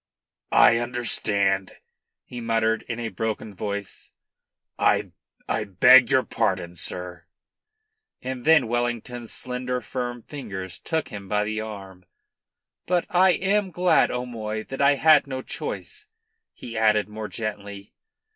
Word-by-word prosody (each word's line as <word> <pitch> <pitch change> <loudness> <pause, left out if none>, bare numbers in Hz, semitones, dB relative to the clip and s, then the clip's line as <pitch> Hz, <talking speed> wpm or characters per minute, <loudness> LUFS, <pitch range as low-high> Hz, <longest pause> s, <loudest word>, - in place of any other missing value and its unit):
"I 115 - +7
understand," 105 -5 0 0.5
he 120 -1 -8
muttered 115 -1 +1
in 115 0 -3
a 115 -1 -3
broken 110 -1 -4
voice, 100 0 -6 0.7
"I - - +2 0.4
I 110 - 0
beg 125 +6 +6
your 130 -1 +3
pardon, 90 -2 -1
sir." 90 0 -6 0.9
And 130 -1 -5
then 155 -5 +5
Wellington's 120 0 -3
slender, 125 0 -3
firm 120 -1 -5
fingers 95 - -7
took 160 -2 -2
him 100 -2 -8
by 105 0 +1
the 110 +1 -3
arm. 95 -4 -9 0.8
"But 180 -1 +1
I 185 +1 +5
am 195 +1 +1
glad, 180 0 +3
O'Moy, 110 -3 -4
that 135 - -4
I 140 0 +5
had 155 +1 +5
no 130 -1 -5
choice," 425 - -6 0.4
he 115 - -10
added 110 -2 +3
more 105 0 -6
gently. 100 -3 -6
115 Hz, 125 wpm, -24 LUFS, 105-125 Hz, 0.9 s, I